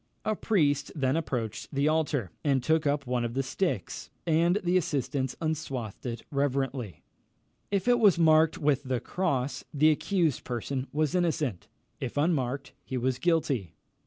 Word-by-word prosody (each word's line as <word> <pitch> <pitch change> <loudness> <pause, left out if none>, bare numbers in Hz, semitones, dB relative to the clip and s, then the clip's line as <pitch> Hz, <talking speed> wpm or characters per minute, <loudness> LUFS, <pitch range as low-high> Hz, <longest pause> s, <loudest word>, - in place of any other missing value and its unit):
A 215 - +1
priest 150 -11 +1
then 135 -2 +1
approached 120 -9 -3
the 140 +1 +1
altar, 150 - 0
and 135 -4 +2
took 160 +1 +2
up 140 -1 0
one 125 -1 0
of 120 0 -3
the 135 - +1
sticks, 175 +8 -2 0.2
and 170 +2 +3
the 175 +1 +1
assistants 140 -6 0
unswathed 140 -9 -3
it 115 -1 -5
reverently. 135 - -1 0.7
If 200 0 -1
it 245 -1 +5
was 205 -7 +5
marked 160 -1 +5
with 145 -2 +2
the 130 -3 -1
cross, 140 -7 -1
the 155 +2 +4
accused 165 -2 0
person 130 +2 -3
was 155 +1 0
innocent; 155 - 0 0.3
if 130 +1 -4
unmarked, 140 -4 0
he 130 - -4
was 125 +1 0
guilty. 140 - 0
145 Hz, 155 wpm, -28 LUFS, 130-160 Hz, 0.7 s, it